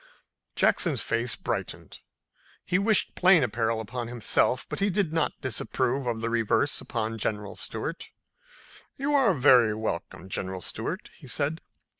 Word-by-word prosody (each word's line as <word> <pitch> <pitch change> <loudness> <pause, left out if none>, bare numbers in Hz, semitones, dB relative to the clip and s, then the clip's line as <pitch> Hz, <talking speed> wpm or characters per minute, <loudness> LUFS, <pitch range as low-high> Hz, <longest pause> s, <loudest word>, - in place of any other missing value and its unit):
Jackson's - - +2
face - - 0
brightened. - - -5 0.7
He 180 - +1
wished 210 0 +2
plain 180 -4 +5
apparel 115 -1 0
upon 120 +2 -5
himself, 120 +2 +1
but - - -5
he 200 +1 +2
did 185 -4 0
not 160 -2 0
disapprove 130 +1 -1
of 115 -2 -2
the 115 - -1
reverse 115 -2 +1
upon 115 0 -3
General 105 -2 -3
Stuart. 150 +10 -4 0.9
"You 280 +2 -1
are 260 -10 +4
very 125 -5 +5
welcome, 95 -4 -4
General 95 -1 -4
Stuart," - - -4
he - - -12
said. 150 +3 -1
120 Hz, 140 wpm, -27 LUFS, 110-165 Hz, 0.9 s, plain